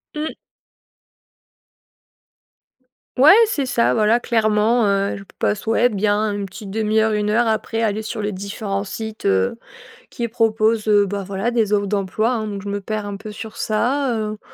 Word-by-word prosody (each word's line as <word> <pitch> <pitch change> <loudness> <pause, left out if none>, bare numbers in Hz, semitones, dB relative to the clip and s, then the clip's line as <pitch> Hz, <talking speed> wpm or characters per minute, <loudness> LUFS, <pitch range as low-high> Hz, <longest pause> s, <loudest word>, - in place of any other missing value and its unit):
Mmh. 305 +1 -4 2.8
Ouais, 285 +7 +8
c'est 290 - -1
ça, 235 -2 +2
voilà, 220 +2 +3
clairement, 220 0 +2
heu, 200 0 +1
je 200 - -9
p - - -24
passe 210 +1 -1
ouais, 235 +2 +4
bien 210 -1 0
une 200 -1 -3
petite 195 +3 -10
1/2 215 +2 0
heure, 220 0 +2
1 210 0 0
heure 230 +2 +2
après 220 +1 -1
aller 215 -1 0
sur 215 0 -5
les 205 0 -2
différents 200 +1 -4
sites, 220 +1 -7
heu, 95 - +1 0.5
qui 235 -1 -3
proposent, 220 -1 +1
heu, 205 -1 +4
bah, 200 0 -4
voilà, 200 +4 -2
des 225 -3 0
offres 200 -1 +1
d'emploi, 205 +3 0
hein, 220 -3 -2
donc 200 -2 -5
je 205 - -7
me 200 0 -2
perds 215 +1 -4
un 200 -1 -5
peu 210 +1 -9
sur 220 +2 -9
ça, 245 +3 0
heu, 215 -1 -3
215 Hz, 180 wpm, -20 LUFS, 205-225 Hz, 2.8 s, Ouais